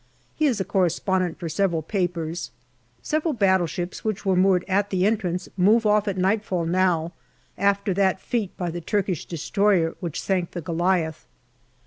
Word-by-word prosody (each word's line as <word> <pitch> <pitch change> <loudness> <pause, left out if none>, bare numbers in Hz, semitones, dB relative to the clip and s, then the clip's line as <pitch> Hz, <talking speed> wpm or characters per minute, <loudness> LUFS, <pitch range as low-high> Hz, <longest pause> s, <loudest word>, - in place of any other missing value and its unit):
He 310 - +1
is 240 -6 0
a 190 - -1
correspondent 185 -1 0
for 170 - -5
several 165 -1 0
papers. 175 -2 -2 0.5
Several 310 -1 0
battleships 185 -4 0
which 215 -2 -3
were 190 -1 +3
moored 185 -1 +3
at 200 +1 +1
the 185 -1 +1
entrance 190 -4 0
move 210 +5 +4
off 210 0 +3
at 195 -2 -1
nightfall 190 -2 0
now, 170 -1 +1 0.4
after 200 0 +1
that 190 0 +2
feat 220 -5 -3
by 175 -2 -2
the 175 +1 -5
Turkish 190 -3 -1
destroyer 180 0 +1
which 170 -4 -4
sank 185 -3 -1
the 175 - -4
Goliath. 165 -1 -1
185 Hz, 155 wpm, -24 LUFS, 175-200 Hz, 0.5 s, move